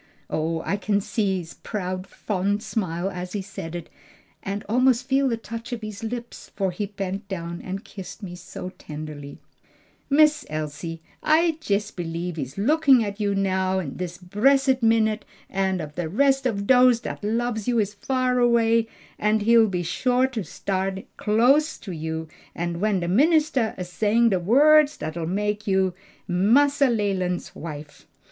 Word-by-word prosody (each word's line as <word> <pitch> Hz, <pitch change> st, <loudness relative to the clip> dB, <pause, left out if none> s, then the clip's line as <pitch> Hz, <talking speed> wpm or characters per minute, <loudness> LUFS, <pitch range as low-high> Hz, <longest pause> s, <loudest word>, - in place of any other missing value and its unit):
Oh, 160 Hz, +1 st, -1 dB
I 200 Hz, -, 0 dB
can 205 Hz, 0 st, +1 dB
see 200 Hz, -1 st, 0 dB
his 170 Hz, -2 st, -7 dB
proud, 185 Hz, -3 st, -4 dB
fond 205 Hz, +1 st, -2 dB
smile 185 Hz, -3 st, -2 dB
as 180 Hz, 0 st, -6 dB
he 205 Hz, -2 st, -2 dB
said 190 Hz, -4 st, -7 dB
it, 170 Hz, -2 st, -6 dB, 0.5 s
and 200 Hz, +1 st, -4 dB
almost 250 Hz, +2 st, +3 dB
feel 270 Hz, 0 st, +2 dB
the 230 Hz, -, -1 dB
touch 230 Hz, +1 st, -7 dB
of 230 Hz, -2 st, -5 dB
his 215 Hz, 0 st, -7 dB
lips; 235 Hz, +1 st, -6 dB
for 195 Hz, -2 st, 0 dB
he 200 Hz, +3 st, -3 dB
bent 195 Hz, 0 st, -5 dB
down 170 Hz, -3 st, -5 dB
and 195 Hz, +2 st, -6 dB
kissed 195 Hz, +2 st, -9 dB
me 180 Hz, -2 st, -6 dB
so 180 Hz, 0 st, -8 dB
tenderly." 150 Hz, -2 st, -8 dB, 0.7 s
"Miss 300 Hz, +1 st, +4 dB
Elsie, 155 Hz, +2 st, -5 dB, 0.2 s
I 320 Hz, +1 st, +3 dB
jes 205 Hz, +1 st, 0 dB
b'lieves 170 Hz, 0 st, -4 dB
he's 135 Hz, -2 st, -5 dB
a -, -, -1 dB
lookin' 275 Hz, -1 st, +5 dB
at 200 Hz, 0 st, -5 dB
you 200 Hz, -1 st, 0 dB
now 190 Hz, -1 st, +1 dB
dis 175 Hz, +3 st, -5 dB
bressed 260 Hz, +8 st, +2 dB
minute, 220 Hz, -1 st, +2 dB, 0.3 s
and 190 Hz, -1 st, 0 dB
ef 150 Hz, -2 st, -6 dB
de 165 Hz, 0 st, -3 dB
res' 270 Hz, -, +3 dB
of 200 Hz, -4 st, -2 dB
dose 250 Hz, 0 st, +6 dB
dat 225 Hz, -, -6 dB
lubs 220 Hz, 0 st, -1 dB
you 245 Hz, -1 st, +2 dB
is 210 Hz, -2 st, +1 dB
far 255 Hz, +3 st, 0 dB
away 230 Hz, -1 st, +3 dB, 0.3 s
he'll 220 Hz, +2 st, +4 dB
be 180 Hz, -3 st, -2 dB
sho 250 Hz, +9 st, +1 dB
to 245 Hz, -5 st, -3 dB
stan' 190 Hz, +3 st, -3 dB
close 245 Hz, +8 st, +4 dB
side -, -, -10 dB
o' -, -, -3 dB
you 160 Hz, -1 st, -4 dB, 0.3 s
when 175 Hz, +3 st, -1 dB
de 170 Hz, -, -2 dB
ministah's 280 Hz, -, +3 dB
a 185 Hz, -, -3 dB
saying 210 Hz, +6 st, +2 dB
de 190 Hz, -4 st, +1 dB
words 295 Hz, -, +5 dB
dat'll 160 Hz, +2 st, -4 dB
make 210 Hz, +3 st, -2 dB
you 190 Hz, -2 st, +2 dB, 0.3 s
Massa 260 Hz, +10 st, +4 dB
Leland's 195 Hz, -5 st, -1 dB
wife." 150 Hz, -2 st, -9 dB
200 Hz, 165 wpm, -24 LUFS, 180-235 Hz, 0.7 s, dose